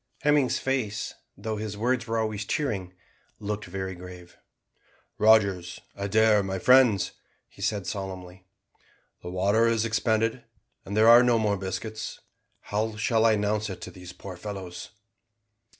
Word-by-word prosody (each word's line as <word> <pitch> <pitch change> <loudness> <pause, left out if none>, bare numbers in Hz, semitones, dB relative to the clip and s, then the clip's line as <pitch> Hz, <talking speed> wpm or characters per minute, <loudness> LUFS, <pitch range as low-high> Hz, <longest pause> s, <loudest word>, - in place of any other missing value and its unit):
Hemming's 145 -3 +3
face, 130 -6 -2 0.2
though 110 -1 -4
his 105 -1 -5
words 120 +2 0
were 115 0 -1
always 110 -2 -1
cheering, 100 -7 -2 0.5
looked 105 0 -4
very 95 +1 -5
grave. 90 0 -11 0.8
"Rogers, 100 -6 +3 0.2
Adair, 105 +1 +3
my 95 -1 -3
friends," 125 -2 +5 0.4
he - - -16
said 100 -4 -1
solemnly, 95 -1 -6 0.7
"the 90 - -7
water 100 +5 +2
is 115 -1 +1
expended, 110 0 0 0.4
and 100 +2 -4
there 110 +1 +6
are 120 +1 +9
no 120 -2 +3
more 105 -2 +1
biscuits 100 +3 -5 0.4
how 110 +1 -2
shall 110 +1 +2
I 110 - +5
announce 105 0 0
it 95 - -6
to - - -7
these 90 -1 -11
poor 95 +1 -9
fellows?" 95 -1 -7
105 Hz, 140 wpm, -27 LUFS, 95-110 Hz, 0.8 s, are